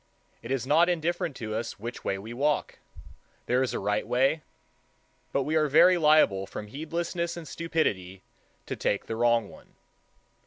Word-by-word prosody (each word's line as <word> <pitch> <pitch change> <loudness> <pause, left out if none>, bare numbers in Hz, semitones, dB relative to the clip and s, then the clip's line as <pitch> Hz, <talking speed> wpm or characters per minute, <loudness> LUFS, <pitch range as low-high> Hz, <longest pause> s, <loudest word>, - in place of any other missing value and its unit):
It 115 - -9
is 130 -2 -1
not 165 +6 +4
indifferent 170 -3 -1
to 110 -3 -5
us 115 +1 -4
which 120 +3 -7
way 95 - -1
we 110 +4 -8
walk. 145 +4 -1 0.7
There 125 +1 +2
is 130 - 0
a - - -2
right 105 +1 -1
way; 135 +5 +2 0.9
but 140 - +1
we 155 +4 -1
are 155 -1 +3
very 180 +6 +6
liable 150 - +4
from 105 - -7
heedlessness 170 - -3
and 165 -2 -8
stupidity 100 - -2 0.4
to - - -4
take 100 - -1
the 115 - -4
wrong 115 -2 +2
one. - - -17
135 Hz, 165 wpm, -27 LUFS, 110-160 Hz, 0.9 s, very